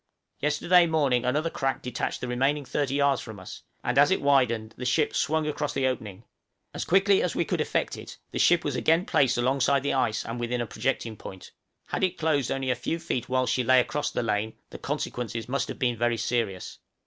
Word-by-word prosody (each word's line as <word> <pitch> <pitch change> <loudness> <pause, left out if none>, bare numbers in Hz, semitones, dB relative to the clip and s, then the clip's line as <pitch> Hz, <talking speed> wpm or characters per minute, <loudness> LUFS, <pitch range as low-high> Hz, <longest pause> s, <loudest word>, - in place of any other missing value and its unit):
Yesterday 170 +4 +3
morning 140 -7 +1
another 150 +6 0
crack 135 0 -2
detached 125 - -3
the 125 - -3
remaining 135 +4 0
30 135 +1 -1
yards 140 -1 +2
from 110 -4 -9
us, 95 - -10 0.2
and 125 +3 +1
as 145 - +6
it 190 - +2
widened 120 -6 +2
the 125 - -7
ship 135 +5 +1
swung 155 +1 +1
across 150 -1 -2
the 135 -1 +1
opening; 110 -5 -3 0.5
as - - -4
quickly 195 +2 +4
as 180 - -1
we 170 - +1
could - - -1
effect - - -1
it - - -10
the - - -3
ship - - +4
was - - -2
again 165 +3 +2
placed 130 -3 +2
alongside 135 +2 +2
the 140 - 0
ice 110 -5 0
and 115 +1 -5
within 120 +1 -2
a 120 - -1
projecting 115 -2 -2
point; 95 -2 -10 0.4
had - - -2
it 185 -1 +1
closed 150 -5 +1
only 135 -1 -1
a - - +1
few 125 +7 -3
feet 165 -8 -3
whilst 130 0 +1
she 125 - +1
lay 130 +2 +5
across 145 +4 -1
the - - -2
lane, 110 0 -1 0.2
the - - -9
consequences 115 -2 -4
must 140 +2 -1
have - - -6
been 120 -2 0
very 120 +1 0
serious. 110 -6 -2
130 Hz, 215 wpm, -27 LUFS, 120-145 Hz, 0.5 s, as